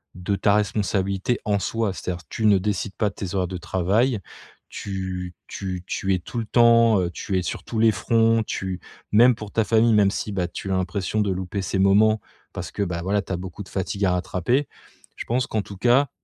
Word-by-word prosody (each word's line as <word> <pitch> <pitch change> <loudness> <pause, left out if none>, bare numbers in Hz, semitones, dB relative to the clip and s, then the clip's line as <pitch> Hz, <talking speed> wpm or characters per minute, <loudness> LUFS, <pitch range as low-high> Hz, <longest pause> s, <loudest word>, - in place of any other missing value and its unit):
de 90 +3 -1
ta 100 - +2
responsabilité, 100 +1 0
en 105 -1 +2
soi. 110 0 -1
C'est-à-dire 90 -1 -5
tu 110 - -2
ne 105 -2 +6
décides 100 0 -2
pas 105 - +1
de 100 - -16
tes 95 -3 -5
horaires 90 -2 +1
de 90 - -5
travail, 100 +8 +1 0.5
tu 95 -2 -5
tu 90 -2 -5
tu 95 0 -1
es 90 - +1
tout 120 - -8
le 115 - -3
temps, 115 -2 +5
heu, 90 - -1
tu 95 +3 -3
es - - -3
sur - - -4
tous 115 - -4
les 110 0 +5
fronts, 115 +1 +2
tu 95 -3 -4 0.3
même 120 +4 +6
pour 105 -3 -9
ta 110 - +2
famille, 115 +1 +4
même 100 -2 +4
si, 105 - -3
beh, 90 -3 -1
tu 95 - -5
as - - +2
l'impression 95 +3 -1
de 100 -2 0
louper 95 +1 -3
ces 95 +2 -1
moments, 105 +3 +4 0.3
parce - - -5
que, 100 - -1
bah, 90 -3 -3
voilà, 100 +2 +1
tu - - -5
as 90 - -1
beaucoup 95 +2 -7
de - - -16
fatigue 100 +1 -2
à 90 - +3
rattraper, 95 - 0 0.5
je - - -5
pense 125 +1 0
qu'en 110 - -1
tout 100 - -10
cas, 125 +6 +3
100 Hz, 220 wpm, -23 LUFS, 95-110 Hz, 0.5 s, ne